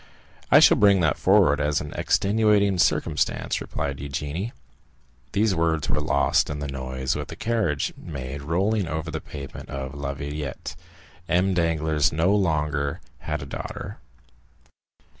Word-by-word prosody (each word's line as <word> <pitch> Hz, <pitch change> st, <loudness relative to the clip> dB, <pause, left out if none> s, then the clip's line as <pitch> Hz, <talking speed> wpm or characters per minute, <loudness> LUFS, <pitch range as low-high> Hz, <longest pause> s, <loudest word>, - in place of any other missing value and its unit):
"I -, -, +8 dB
shall -, -, +7 dB
bring 100 Hz, -2 st, +5 dB
that 80 Hz, -5 st, +1 dB
forward 90 Hz, -7 st, +4 dB
as 75 Hz, 0 st, +1 dB
an 75 Hz, -, -7 dB
extenuating 100 Hz, -2 st, +2 dB
circumstance," -, -, +1 dB
replied 70 Hz, -1 st, -4 dB
Eugénie. 75 Hz, -, -4 dB, 0.8 s
These 105 Hz, +1 st, +2 dB
words 80 Hz, -2 st, 0 dB
were 75 Hz, -, +1 dB
lost 70 Hz, -2 st, +2 dB
in 75 Hz, -, -3 dB
the 70 Hz, 0 st, -4 dB
noise 65 Hz, -1 st, -3 dB
which -, -, -4 dB
the -, -, -8 dB
carriage 110 Hz, -11 st, 0 dB
made 70 Hz, -2 st, -6 dB
in 70 Hz, -, -11 dB
rolling 95 Hz, +4 st, +1 dB
over 80 Hz, +1 st, -3 dB
the 80 Hz, -, -4 dB
pavement 70 Hz, -2 st, -9 dB
of 70 Hz, 0 st, -5 dB
La 70 Hz, -1 st, -4 dB
Villette. 70 Hz, 0 st, -5 dB, 0.5 s
M. 95 Hz, +2 st, +2 dB
Danglars 80 Hz, -3 st, +1 dB
no 80 Hz, +6 st, +2 dB
longer 75 Hz, -6 st, 0 dB, 0.2 s
had 75 Hz, -1 st, -4 dB
a -, -, -7 dB
daughter. 70 Hz, -, -7 dB
75 Hz, 145 wpm, -25 LUFS, 70-95 Hz, 0.8 s, I